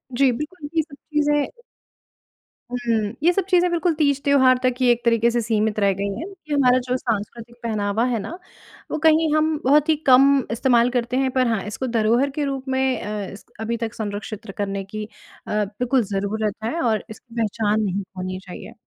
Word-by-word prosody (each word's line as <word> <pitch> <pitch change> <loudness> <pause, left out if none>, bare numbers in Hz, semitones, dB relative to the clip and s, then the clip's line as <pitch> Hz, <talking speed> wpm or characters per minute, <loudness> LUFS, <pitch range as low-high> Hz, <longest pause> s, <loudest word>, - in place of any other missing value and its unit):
जी 265 -1 +4
बिल्कुल, 300 +4 -6
ये 320 - +4
सब 295 -2 -12
चीज़ें 295 0 0 1.2
हुँ 250 - -1 0.5
ये 350 - +6
सब 390 +1 +1
चीज़ें 360 -1 +4
बिल्कुल 345 0 +1
तीज-त्योहार 280 -3 +3
तक 255 -1 +3
ही 255 - +3
एक 240 0 0
तरीके 230 0 +3
से 240 0 0
सीमित 215 -1 0
रह 200 -1 +3
गई 200 - 0
हैं, 335 - -5
ये 355 -7 -8
हमारा 255 -3 +4
जो 250 - +1
सांस्कृतिक 235 0 -4
पहनावा 215 0 0
है 240 -3 0
ना, 340 - -6 0.5
वो - - -1
कहीं 315 -1 +4
हम 310 0 +2
बहुत 295 +3 +4
ही 315 - +5
कम 260 +1 +8 0.3
इस्तेमाल 235 0 +3
करते 245 +1 -1
हैं। 265 -1 +1
पर 255 -1 +2
हाँ, 225 -4 0
इसको 255 +5 -4
धरोहर 235 +4 +2
के 290 +2 -3
रूप 270 -1 -4
में 260 -2 +1
अ, 210 -2 -4
इसक 200 - -14
अभी 230 +1 -2
तक 225 - -6
संरक्षित 210 0 -5
करने 200 -1 -2
की 210 +2 -6
अ, 210 -1 -18 0.2
बिल्कुल 245 +5 0
ज़रूरत 205 +1 -1
है 315 +10 -2
और 220 -3 +1
इसकी 230 +2 -13
पहचान 215 -1 0
नहीं 200 -1 -1
खोनी 185 0 -6
चाहिए। 190 +4 -10
240 Hz, 190 wpm, -22 LUFS, 215-280 Hz, 1.2 s, कम